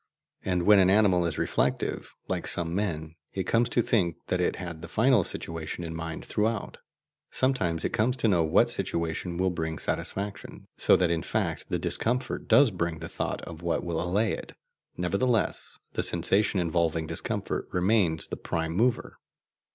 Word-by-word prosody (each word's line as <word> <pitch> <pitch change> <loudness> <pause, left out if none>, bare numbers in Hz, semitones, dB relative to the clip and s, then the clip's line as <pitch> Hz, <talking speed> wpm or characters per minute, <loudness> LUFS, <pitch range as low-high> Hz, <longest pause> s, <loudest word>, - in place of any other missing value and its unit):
And 90 -2 0
when 105 +2 +7
an 95 -1 +5
animal 95 -4 +4
is 80 - -3
reflective, - - -1 0.2
like - - -2
some 85 -1 -1
men, 80 -6 -2 0.2
it 95 - -1
comes 115 +5 +2
to 120 - +2
think 90 -9 +1
that 90 - +1
it 90 - +1
had 85 -3 -7
the - - -7
final 115 +3 +3
situation 80 +1 -5
in 80 -1 -5
mind 80 -1 -5
throughout; 110 0 -1 0.5
sometimes 110 -12 0
it - - -2
comes 125 +4 +1
to 115 - +2
know 90 -5 +3
what 80 - +3
situation 85 +1 -2
will 95 0 +1
bring 80 -2 -3
satisfaction, 100 +6 -2
so - - +4
that 90 -2 +2
in 85 -1 0
fact - - -2
the - - +1
discomfort 125 +3 -1
does 140 -4 +6
bring 85 -3 -2
the 80 0 -6
thought - - -3
of 85 -1 -8
what 85 -1 -1
will 85 -2 -2
allay 100 +5 +1
it. - - -6 0.4
Nevertheless 100 +6 0 0.2
the - - 0
sensation 95 +4 +2
involving 85 -2 0
discomfort - - -3
remains 90 -3 +2
the - - -5
prime 80 -1 -2
mover. 115 +6 0
90 Hz, 170 wpm, -28 LUFS, 85-105 Hz, 0.5 s, when